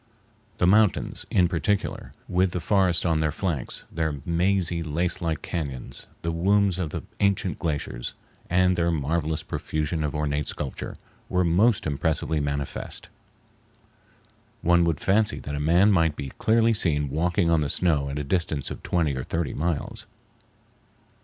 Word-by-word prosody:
The 90 - +2
mountains, 105 +2 +2
in 90 -2 +4
particular, 95 +4 -1 0.2
with 90 0 +1
the 90 - -1
forests 95 -1 +2
on 80 -2 +2
their 80 -1 +1
flanks, 85 -9 -3
their 80 -2 -1
mazy 85 0 +1
lacelike 80 0 -2
cañons, 70 -7 -5 0.2
the 85 - 0
wombs 95 +2 +2
of 85 -4 -1
the - - -5 0.2
ancient 100 -2 +1
glaciers, 75 -7 -3 0.3
and 90 +1 +3
their 85 -1 +1
marvelous 80 0 -1
profusion 80 +1 -2
of 75 0 -2
ornate 75 -1 -1
sculpture, 70 -3 -5 0.3
were 90 0 +2
most 95 +6 +3
impressively 80 +1 0
manifest. 70 -1 -4 1.5
One 85 0 +4
would 80 -3 0
fancy 105 +2 +2
that 75 - -6
a 70 - -2
man 85 +7 +4
might 80 -5 +3
be 70 -3 -6
clearly 115 0 +4
seen 75 -9 +2
walking 85 +3 +1
on 80 -2 +3
the 75 - -1
snow 75 -3 +1
at 70 - -4
a 75 - -2
distance 80 -2 -1
of - - -7
twenty 80 -6 0
or 65 - -3
thirty 85 +2 -2
miles. 80 -1 -3
85 Hz, 150 wpm, -25 LUFS, 75-90 Hz, 1.5 s, in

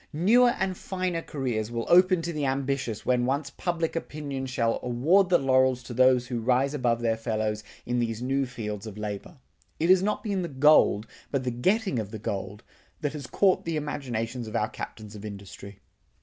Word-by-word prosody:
Newer 235 +10 +4
and 190 -1 -1
finer 185 -2 -3
careers 125 -9 -3
will 115 -1 -3
open 180 -1 +5
to 170 +1 -3
the 150 -2 -2
ambitious 130 -4 -2
when 125 -1 +2
once 140 +1 -1
public 170 -2 -2
opinion 145 -5 -4
shall 115 -3 0
award 155 +11 +3
the 175 - +6
laurels 130 -1 +2
to 120 - -8
those 130 0 +4
who 120 -1 -3
rise 130 +4 +2
above 120 -4 0
their 115 -1 +1
fellows 110 -2 -2 0.2
in 120 0 0
these 115 -2 -1
new 135 +2 0
fields 105 -3 -5
of 105 -1 -8
labor. 105 - -6 0.4
It 165 +3 +4
has 185 -1 +6
not 210 +2 -1
been 200 -4 -1
the 175 - -2
gold, 140 -7 +4 0.2
but 140 -2 -1
the 125 - -1
getting 190 - +1
of 105 -3 -4
the 110 - -6
gold, 100 0 -5 0.4
that 145 -2 -1
has 145 -4 -6
caught 190 +7 +2
the 165 -1 -2
imaginations 125 -5 -3
of 110 - -7
our 105 - +1
captains 110 -1 -8
of 105 - -9
industry. 100 -1 -9
130 Hz, 190 wpm, -27 LUFS, 115-155 Hz, 0.4 s, the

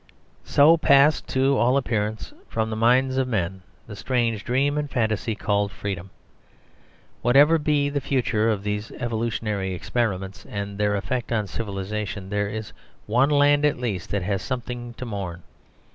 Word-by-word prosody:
So 155 +4 +6
passed, 140 -1 +4
to 135 +1 +2
all 125 +3 +3
appearance, 110 -4 -2 0.2
from 110 0 -1
the - - -2
minds 130 +4 +3
of 130 -1 +1
men 95 -5 -2 0.2
the 105 - -9
strange 115 -2 -1
dream 140 +4 +1
and 150 -1 -2
fantasy 110 -2 -1
called 100 -1 0
freedom. 95 -2 -5 1.1
Whatever 145 +7 +5
be 150 -1 +1
the 145 0 -2
future 115 -5 +1
of 105 -3 -1
these 105 +1 -3
evolutionary 110 -5 -2
experiments 95 -4 -2
and 100 0 -5
their 105 0 +2
effect 120 +5 -3
on 110 -3 +1
civilisation, 100 -1 -5
there 105 0 0
is 110 0 -6 0.3
one 125 +6 +3
land 145 0 +4
at 150 - +2
least 110 -8 -3
that 100 -2 -1
has 95 0 -1
something 120 -2 -5
to 125 - -6
mourn. 95 -6 -5
110 Hz, 155 wpm, -24 LUFS, 100-130 Hz, 1.1 s, So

